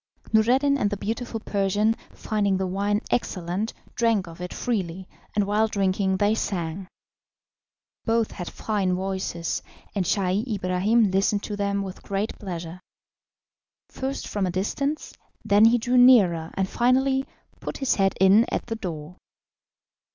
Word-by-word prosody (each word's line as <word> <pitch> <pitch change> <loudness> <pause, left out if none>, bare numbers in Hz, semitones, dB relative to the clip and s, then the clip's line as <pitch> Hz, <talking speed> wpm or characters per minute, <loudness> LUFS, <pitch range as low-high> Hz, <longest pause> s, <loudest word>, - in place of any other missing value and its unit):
Noureddin 260 +6 +4
and 205 - +2
the 205 - -3
beautiful 225 +3 -3
Persian, 205 +1 +1 0.2
finding 205 -3 0
the 190 - -1
wine 200 +3 0
excellent, 185 -1 -1 0.2
drank 225 -5 +2
of 165 +1 -10
it 180 - -5
freely, 190 -6 -3 0.3
and 205 -1 +2
while 210 +2 +2
drinking 195 -2 0
they 205 +2 +3
sang. 180 -3 -3 1.2
Both 230 -1 +1
had 180 - -6
fine 195 -4 -1
voices, 185 -3 -3 0.3
and 195 - 0
Scheih 190 +2 +1
Ibrahim 195 +3 +2
listened 200 +2 +1
to 210 - -4
them 200 0 -1
with 190 -1 -8
great 200 +2 -2
pleasure 175 -3 -6 1.1
first 270 +1 -4
from 200 -3 -1
a - - -1
distance, 275 - -2 0.3
then 205 +2 +6
he 235 +2 +6
drew 245 +2 +1
nearer, 190 -11 +6
and 190 -1 0
finally 265 +4 +2 0.3
put - - -5
his 270 -2 +1
head 195 -1 +2
in 195 +5 +6
at - - -2
the 225 - -3
door. 175 -4 -6
200 Hz, 145 wpm, -25 LUFS, 185-225 Hz, 1.2 s, then